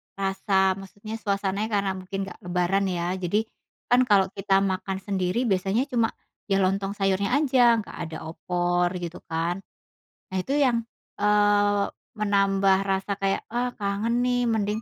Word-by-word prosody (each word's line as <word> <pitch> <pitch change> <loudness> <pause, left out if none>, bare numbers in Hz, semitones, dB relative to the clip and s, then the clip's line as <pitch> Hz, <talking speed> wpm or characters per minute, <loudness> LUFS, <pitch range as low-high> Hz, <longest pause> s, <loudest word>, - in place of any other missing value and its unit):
Rasa 195 -1 +1
maksudnya 205 +3 -8
suasananya, 200 +1 -1
karena 200 -1 +1
mungkin 195 +1 -4
nggak 175 - -10
lebaran, 180 +2 +1
ya. 175 0 -1
Jadi, 200 +5 0 0.5
kan 250 +1 +5
kalau 200 -3 +5
kita 195 0 +2
makan 190 0 -2
sendiri 195 +3 0
biasanya 195 +2 +1
cuma 230 -2 +3 0.4
ya 195 -1 +2
lontong 195 +1 0
sayurnya 200 +4 +1
aja, 255 -5 +5
nggak 210 - -8 0.2
ada 160 - -5
opor, 175 0 0
gitu, 170 0 -6
kan. 165 +3 -1 0.7
Nah, 190 - -3
itu 270 +9 -3
yang, 245 -5 +2 0.3
eee, 205 -1 +3 0.3
menambah 195 -2 +3
rasa 195 +1 -1
kayak, 195 0 0
"Ah, 245 +1 -1
kangen 210 +4 0
nih, 245 0 +1
mending 215 0 0
195 Hz, 145 wpm, -25 LUFS, 190-215 Hz, 0.7 s, kan